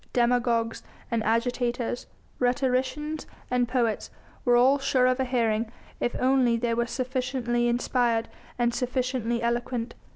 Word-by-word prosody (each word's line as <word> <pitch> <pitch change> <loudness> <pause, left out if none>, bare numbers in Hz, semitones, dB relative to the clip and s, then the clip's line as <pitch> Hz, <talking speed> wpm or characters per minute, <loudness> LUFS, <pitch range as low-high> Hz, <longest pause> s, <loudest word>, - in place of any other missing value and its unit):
Demagogues 235 -2 +1 0.3
and 230 -2 +1
agitators, 240 +1 0 0.3
rhetoricians 260 +4 0 0.2
and 250 -1 +2
poets 235 -3 0 0.3
were 245 -1 +4
all 260 +4 +5
sure 260 -2 +2
of 255 +1 +2
a 265 - +1
hearing, 230 -3 0 0.3
if 240 - -1
only 255 -2 +3
they 230 0 0
were 235 +1 0
sufficiently 250 -2 -1
inspired 240 -1 +1 0.3
and 240 -1 +1
sufficiently 250 -2 -1
eloquent. 235 0 -1
245 Hz, 125 wpm, -27 LUFS, 235-255 Hz, 0.3 s, all